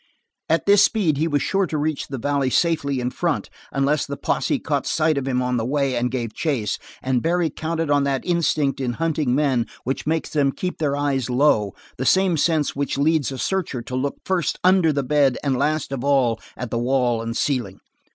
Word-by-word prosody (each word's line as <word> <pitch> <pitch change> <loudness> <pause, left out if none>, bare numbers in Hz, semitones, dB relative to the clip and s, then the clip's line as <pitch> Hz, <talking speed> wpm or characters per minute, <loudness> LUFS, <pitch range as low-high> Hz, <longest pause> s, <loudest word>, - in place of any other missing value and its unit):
At 165 +1 +2
this 200 0 +6
speed 190 - +2
he 160 +3 +1
was 145 -3 0
sure 195 -1 +1
to 155 - -3
reach 150 0 -2
the 135 - -5
valley 140 +1 0
safely 140 -3 +1
in 125 0 -2
front 170 0 -2 0.2
unless 140 +2 +1
the 140 0 -5
posse - - 0
caught - - -2
sight 155 0 +2
of 135 -1 -2
him 125 -1 0
on 125 0 0
the 115 - -1
way 135 +1 0
and 120 +1 0
gave 120 -3 -3
chase, 125 -10 -1 0.2
and 130 -2 +1
Barry 170 -1 +1
counted 160 0 -2
on 145 -1 +3
that 135 -2 -1
instinct 155 -6 +1
in 125 -2 -1
hunting 155 -4 0
men 135 -5 +1 0.2
which 135 +3 -3
makes 160 0 -1
them 140 -3 +1
keep 180 0 -4
their 145 -3 0
eyes 140 -3 -1
low 125 -6 +2 0.2
the 130 - -3
same 190 -2 +4
sense 155 -1 +1
which 140 0 -2
leads 150 -1 +2
a 135 - -5
searcher 155 -8 -2
to 125 - -6
look 140 +2 -1
first 185 -4 0
under 185 -3 +4
the 140 -1 -1
bed 140 -1 +2
and 140 -2 +1
last 150 +2 0
of 135 -2 -3
all 130 -5 +2 0.2
at 125 -2 -5
the 115 - 0
wall 120 -2 +1
and 115 +1 -4
ceiling. 120 -9 -1
140 Hz, 210 wpm, -22 LUFS, 130-160 Hz, 0.2 s, this